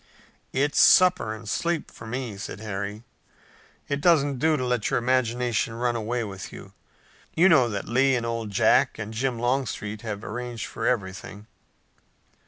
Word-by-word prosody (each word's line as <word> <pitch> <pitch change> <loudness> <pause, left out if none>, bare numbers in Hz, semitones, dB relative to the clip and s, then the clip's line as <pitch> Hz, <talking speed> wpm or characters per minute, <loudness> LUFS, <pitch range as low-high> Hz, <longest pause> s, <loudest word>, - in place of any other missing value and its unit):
"It's 145 +2 +2
supper 180 - +5
and 110 0 -11
sleep 170 +9 -1
for 115 - -11
me," 120 -2 -4
said 100 0 -7
Harry. 105 0 -5 0.8
"It 145 0 -2
doesn't 145 -5 +3
do 155 +2 +3
to 130 - -2
let 125 -3 0
your - - +1
imagination 120 -2 0
run 120 0 0
away 115 +1 -2
with 95 -4 -7
you. - - -11 0.6
You 175 +4 +5
know 135 -9 +5
that 100 -2 -4
Lee 135 +2 +3
and 120 -2 -1
Old 115 -2 -3
Jack 125 +6 +3
and 110 0 -6
Jim 125 +1 -1
Longstreet 115 -4 -2
have 105 -2 -5
arranged 120 0 -5
for - - -4
everything." 100 -2 -3
120 Hz, 160 wpm, -25 LUFS, 110-130 Hz, 0.8 s, supper